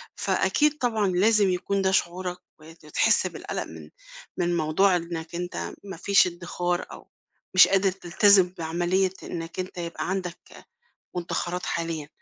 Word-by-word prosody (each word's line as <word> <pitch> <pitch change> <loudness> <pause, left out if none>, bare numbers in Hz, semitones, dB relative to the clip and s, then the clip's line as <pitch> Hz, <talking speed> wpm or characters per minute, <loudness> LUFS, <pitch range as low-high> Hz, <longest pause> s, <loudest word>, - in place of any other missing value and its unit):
فأكيد 300 0 +1
طبعًا 220 -6 0
لازم 200 +2 +3
يكون 185 +2 -1
ده 190 - +2
شعورك، 180 0 -1 0.2
وت 160 0 -16
تحس 150 - +3
بالقلَق - - -5
من - - -11 0.5
من 175 -1 0
موضوع 175 +5 +3
إنك 170 -1 -5
أنت 180 +1 -4
ما 195 -4 -8
فيش 200 +2 +4
إدّخار 175 0 -3
أو - - -12 0.5
مش 185 - +8
قادر 195 0 +2
تلتزم 190 0 +4
بعملية 175 +3 0
إنك 165 +1 -6
أنت 185 0 -5
يبقى 170 +1 -4
عندك، 185 -2 -3
آآ، - - -14 0.5
مدّخَرات 175 0 -3
حاليًا. 165 -3 -3
180 Hz, 140 wpm, -25 LUFS, 170-190 Hz, 0.5 s, مش